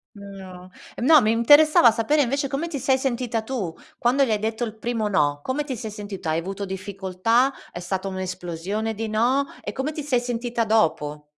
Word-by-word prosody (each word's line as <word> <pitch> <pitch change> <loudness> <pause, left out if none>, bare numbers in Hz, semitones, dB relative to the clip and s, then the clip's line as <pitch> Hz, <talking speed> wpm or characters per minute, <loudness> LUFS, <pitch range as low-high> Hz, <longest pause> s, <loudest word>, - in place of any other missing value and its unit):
No. 190 -2 -11 0.3
No, 290 +3 +6
mi 215 0 +2
interessava 270 +1 +6
sapere 260 +7 +1
invece 275 +3 -1
come 280 +5 -3
ti 295 -4 -4
sei 260 +1 +2
sentita 245 -3 -2
tu 220 -9 -4 0.2
quando 260 +4 +3
gli 235 - 0
hai 210 - +1
detto 220 +2 -2
il 220 -2 -4
primo 225 -1 -2
no. 145 -7 +1
Come 285 +3 -1
ti 275 -3 -5
sei 220 -2 -6
sentita? 200 -5 -5
Hai 160 - +1
avuto 195 +4 -5
difficoltà? 195 +6 0 0.2
È - - -7
stata 190 +2 -3
un'esplosione 185 +3 -4
di 220 +1 -4
no? 245 +6 +2 0.2
E - - -6
come 270 +3 -2
ti 305 - -5
sei 260 -4 +1
sentita 240 -1 -2
dopo? 150 -9 0
220 Hz, 190 wpm, -23 LUFS, 190-255 Hz, 0.3 s, No